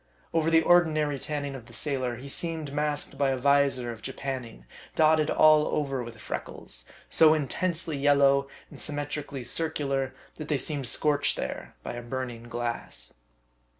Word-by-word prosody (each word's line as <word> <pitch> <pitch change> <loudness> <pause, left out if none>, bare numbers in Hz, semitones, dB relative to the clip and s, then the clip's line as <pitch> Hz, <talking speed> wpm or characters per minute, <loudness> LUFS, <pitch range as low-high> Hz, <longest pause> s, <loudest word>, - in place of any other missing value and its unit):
Over 165 -1 +2
the 165 0 +5
ordinary 155 -5 +3
tanriing 145 -2 -3
of 120 -3 -10
the 120 - -14
sailor, 130 -2 -2
he 130 +4 -9
seemed 160 -1 -3
masked 150 -1 -1
by 140 -1 +3
a 135 - 0
visor 135 -2 +2
of 115 -1 -10
japanning, 125 - -5 0.3
dotted 155 -1 +4
all 155 -1 +6
over 135 -3 -1
with 120 -1 -8
freckles, - - -6 0.2
so 160 -1 +6
intensely 160 +2 0
yellow, 140 -1 +4 0.2
and - - -9
symmetrically 145 -2 -3
circular, 140 -3 -1 0.2
that 155 - -6
they 150 - +1
seemed 140 -1 -1
scorched 145 +3 +2
there - - -5
by - - -5
a 120 - -5
burning 120 -1 -5
glass. 120 - -4
140 Hz, 150 wpm, -28 LUFS, 130-155 Hz, 0.3 s, all